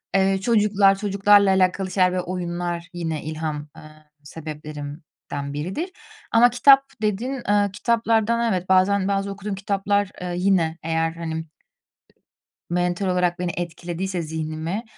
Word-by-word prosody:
Eee, 195 0 +3
çocuklar, 205 -3 +4
çocuklarla 200 0 +4
alakalı 190 0 +1
şeyler 185 -1 +3
ve 185 - 0
oyunlar 175 -1 -4
yine 165 -3 -3
ilham, 155 -1 -4
ııı, 155 0 -14 0.2
sebeplerimden 150 -2 -8
biridir 185 - -3 0.4
ama 235 +2 +6
kitap, 270 +3 +6 0.2
dedin, 230 +6 -1
ııı, 205 -1 +3
kitaplardan 230 +1 +1
evet, 185 0 -3
bazen, 190 +1 +3
bazı 200 0 -1
okuduğum 200 0 -5
kitaplar, 200 0 0
eee, 180 -1 -3
yine 180 -4 +2
eğer 165 0 0
hani 160 -1 -5 1.3
mental 180 +2 0
olarak 180 -1 +1
beni, 180 -1 -2
etkilediyse, 175 +1 -4
zihnimi 160 +6 -4
185 Hz, 125 wpm, -23 LUFS, 165-200 Hz, 1.3 s, ama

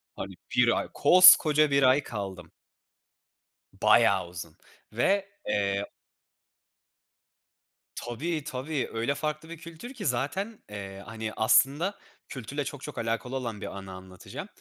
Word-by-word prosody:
Hani, - - -7 0.2
1 - - +4
ay, - - -4
koskoca 155 -5 +7
1 140 0 +3
ay 130 +3 +4
kaldım. 95 -7 -7 1.2
Bayağı - - +3
uzun 85 -2 -9 0.4
ve, 195 - +2 0.2
eee 100 0 -1 2.1
Tabii, 150 +7 -4
tabii, 140 +1 -3
öyle 115 +5 -1
farklı 155 +2 -4
bir 170 - -8
kültür 170 +9 -10
ki 230 -6 -7
zaten, 185 - -2
eee, 100 -1 -8
hani, 110 +1 -6
aslında 145 - +2 0.3
kültürle 135 +3 -5
çok 140 0 -7
çok 150 - -8
alakalı 115 +3 -3
olan 115 -5 -4
bir 100 - -6
anı 95 -1 -9
anlatacağım. 95 0 -9
130 Hz, 125 wpm, -27 LUFS, 105-155 Hz, 2.1 s, koskoca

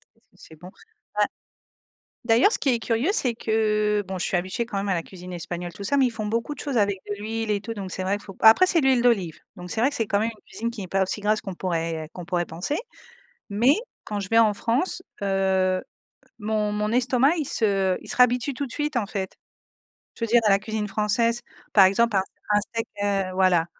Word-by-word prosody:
Qu'est - - -33
ce - - -40
que - - -27
c'est 160 - -14
bon 175 +4 -12 0.5
a - - +3 1.0
d'ailleurs 235 - +5
ce - - 0
qui 275 - +1
est 240 -2 +2
curieux 230 - 0
c'est 250 - +1
que 210 -2 +1
bon 190 -1 -4
je - - -1
suis - - -1
habituée 185 +7 -2
quand 225 -4 -5
même 200 0 -2
à - - +2
la 165 - -2
cuisine 180 -1 -11
espagnole 175 0 -5
tout 200 - -8
ça, 280 +8 +1
mais 270 - +5
ils - - -3
font 220 -2 -4
beaucoup 230 +7 -2
de - - -14
choses 280 -4 -2
avec 200 -2 +2
de 205 - -2
l'huile 225 0 -2
et 205 - 0
tout 230 +2 -5
donc 195 -3 -6
c'est 185 - -3
vrai 200 +2 0
faut 195 -2 -11
après 225 +12 +8
c'est 335 -4 +3
l'huile 260 -3 +3
d'olive 200 -9 +1 0.2
donc 180 0 -9
c'est 225 - -1
vrai 265 - +4
que 285 - -5
c'est 225 -3 -1
quand 200 - +1
même 225 +2 0
une 215 - -22
cuisine 230 +1 -4
qui 215 - -7
n'est 185 - -6
pas 195 +1 +1
aussi 200 +2 -3
grasse 215 +1 +1
qu'on 195 - -6
pourrait 165 -3 -2
qu'on 180 - -8
pourrait 175 0 -1
penser 175 - -3 0.7
mais 235 +7 +4 0.3
quand 210 -1 -3
je 195 -1 -5
vais 225 - +3
en 220 -2 +5
France, 245 - -1 0.2
heu, 190 -1 +1 0.6
mon 210 0 -1
mon 210 +1 -1
estomac 255 +5 +3
il 305 - -1
se 195 -6 +1
il - - -10
se - - -2
réhabitue 250 +2 +3
tout 285 +1 -2
de 245 - -10
suite, 295 -2 -2
en 225 - 0
fait. 195 -2 -4 0.8
Je 230 - -4
veux - - +1
dire 240 - +6
dans - - +5
la 195 - +4
cuisine 215 0 -3
française, 225 +3 +1 0.3
par 200 - +8
exemple, 215 +3 +3
un 190 - +4 0.3
un 205 - +5
steak, 230 +1 -4 0.2
heu, 195 -2 0
voilà, 185 -3 +3
210 Hz, 245 wpm, -24 LUFS, 190-235 Hz, 1.0 s, après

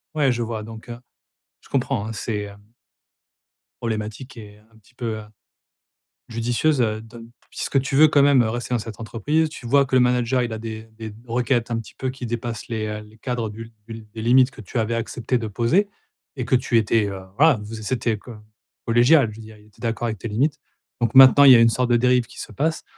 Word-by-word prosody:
Ouais, 140 -4 +3
je 120 0 -2
vois. 110 -1 -4
Donc, 110 +1 -11
heu 120 0 -7 0.6
je - - -21
comprends 130 -5 -1
hein, 110 - -5
c'est, 105 -1 -3
hem 100 0 -12 1.2
problématique 110 +3 -5
et 105 -1 -12
un 110 - -22
petit 110 +3 -25
peu, 115 -3 -4
heu, 110 - -8 1.1
judicieuse, 120 +5 0
heu, 110 -2 0
don 115 +1 -12 0.2
puisque 135 - -1
tu 135 +1 -2
veux 155 +2 +8
quand 145 -2 +4
même, 140 -2 +5
heu, 110 - -1
rester 120 +2 -4
dans 120 - +2
cette 110 -2 -8
entreprise, 145 +8 0
tu 130 -5 -10
vois 140 +3 +4
que 130 -1 0
le - - +6
manager 125 0 +2
il 120 - -3
a 110 - -4
des 110 0 -7
des 110 -1 -7
d 105 - -14
requêtes, 120 0 0
un - - 0
petit 110 - -13
peu, 130 - -2
qui 130 -1 -8
dépassent 115 -1 -5
les, 110 -2 -3
heu, 105 0 -4
les 105 +1 -18
cadres 120 -3 -3
du 110 +2 -8
l 115 - -15 0.2
du 115 - -7
l 110 -1 -11
des 110 - -6
limites 125 +3 +4
que - - -12
tu 110 +4 -5
avais 115 +1 0
accepté 120 +2 -2
de 110 -2 -4
poser, 120 - +1 0.5
et 125 - -3
que 130 - 0
tu 125 -1 +2
étais, 110 -1 +2
heu 95 -1 -6 0.2
voilà, 150 -3 +5
vous 110 +2 -8
c 110 - -7
c'était 115 0 -1
co 120 +4 -12 0.5
collégial. 120 +3 +5
Je 110 - -11
veux - - -10
dire: 110 0 -13
«il 105 - -21
était 105 - -24
d'accord 115 0 -2
avec 110 -3 -3
tes 115 - -5
limites». 130 +8 0 0.4
Donc 120 +1 0
maintenant, 135 +2 +9
il 140 - +9
y 125 - +9
a - - +5
une 115 - +6
sorte 125 +2 0
de 120 - +5
dérive 125 0 +2
qui 125 - -15
se - - -8
passe. 160 +3 -1
115 Hz, 245 wpm, -22 LUFS, 110-125 Hz, 1.2 s, maintenant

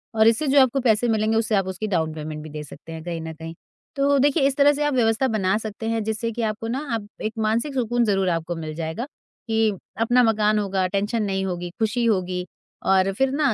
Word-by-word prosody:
और 220 0 +5
इससे 230 +6 +3
जो 275 0 +6
आपको 260 +1 +3
पैसे 235 0 +3
मिलेंगे, 220 0 +2
उससे 220 -1 +1
आप 195 -1 +1
उसकी 190 +3 -4
डाउन 160 -5 0
पेमेंट 155 0 -6
भी 155 - -9
दे 150 0 -6
सकते 155 +2 -12
हैं 160 -1 -7
कहीं 170 -1 -4
न 160 0 -6
कहीं। 160 +1 -8 0.4
तो 280 0 +3
देखिए, 285 +1 +3
इस 275 - -1
तरह 290 +1 +6
से 295 +1 -1
आप 295 - +1
व्यवस्था 230 +1 +2
बना 205 -4 +1
सकते 220 0 -5
हैं 225 -1 0
जिससे 220 +2 -2
कि 235 - -4
आपको 220 +1 -2
ना 255 +4 -2 0.2
आप 205 -2 -5 0.2
एक 215 0 -2
मानसिक 225 +6 0
सुकून 240 -1 +1
ज़रूर 195 -3 +1
आपको 165 0 -2
मिल 155 -1 -5
जाएगा, 165 +9 -3 0.4
कि 220 -1 +2 0.3
अपना 245 +2 +4
मकान 215 -1 +3
होगा, 195 -2 0
टेंशन 205 +3 -1
नहीं 195 -1 -1
होगी, 175 -1 -3
खुशी 220 +2 0
होगी 185 -4 0 0.4
और 190 0 +3
फिर 265 +6 +1
ना 280 -3 +2
215 Hz, 230 wpm, -23 LUFS, 185-235 Hz, 0.4 s, जो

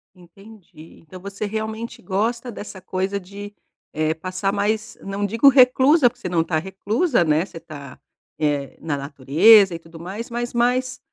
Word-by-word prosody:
Entendi. 180 -2 -16
Então 185 +3 -11
você 200 +2 -6
realmente 220 +2 -5
gosta 230 +6 -2
dessa 205 -3 -9
coisa 190 +2 -3
de, 200 +2 -10 0.4
eh, 155 0 0
passar 185 +4 -3
mais 215 +2 -2
não 195 +1 -3
digo 230 +7 +3
reclusa, 260 +1 +5
porque 245 +1 -24
você 180 - -4
não 170 -2 +1
está 160 -1 -1
reclusa, 200 - 0
né? 155 +3 +1
Você 170 -4 -11
tá, 145 -5 -11 0.4
eh, 145 -2 -1
na 150 -3 -2
natureza 160 - +5
e 165 - -7
tudo 165 0 -14
mais, 195 +8 -7
mas 240 +1 -4
mais 250 +1 0
195 Hz, 160 wpm, -21 LUFS, 165-225 Hz, 0.4 s, reclusa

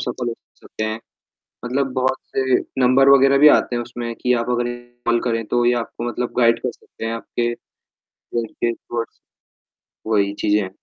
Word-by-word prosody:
सफल 125 0 -3
हो 115 - -3 0.3
सकते 110 - -5
हैं। 110 0 -2 0.7
मतलब 135 +2 -1
बहुत 130 0 +1 0.2
से 130 -1 +3 0.3
नंबर 135 +2 +5
वगैरह 140 0 +6
भी 150 - +8
आते 120 - -2
हैं 120 - -1
उसमें 120 -1 -6
कि 125 - +2
आप 115 - -4
अगर 120 0 0
इन्हें 120 0 -7 0.2
कॉल 120 0 +3
करें 115 -2 0
तो 120 +2 +1
ये 120 - +4
आपको 120 +1 -7
मतलब 120 +1 -3
गाइड 115 -1 +4
कर 125 - -1
सकते 115 - -11
हैं 115 - -2
आपके 120 +1 -2 0.6
गोल 115 -1 -5
के 120 +2 -2
टुवर्ड्स 115 0 -6 0.9
वही 100 -2 +2
चीज़ें 105 0 +3
है। 95 - -5
120 Hz, 190 wpm, -21 LUFS, 115-125 Hz, 0.9 s, भी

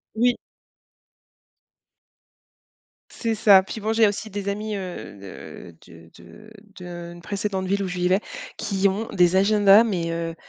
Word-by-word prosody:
Oui. 245 +2 +2 2.7
C'est 230 -2 -2
ça. 205 -3 +6
Puis 215 +2 -7
bon, 220 +1 -1
j'ai 225 -1 +4
aussi 205 +2 -4
des 200 0 -4
amis, 210 +1 -3
heu, 180 - -7
de 95 -3 -11
de 80 0 -16 0.7
de 175 -1 -8
d'une 175 - -13
précédente 195 0 -3
ville 200 +2 0
où - - -3
je 180 - -5
vivais, 180 +2 +2 0.4
qui 200 -2 0
ont 205 +4 -2
des 180 0 +3
agendas, 205 +2 +6
mais 175 -7 -2
heu, 165 0 -4
195 Hz, 145 wpm, -23 LUFS, 175-210 Hz, 2.7 s, ça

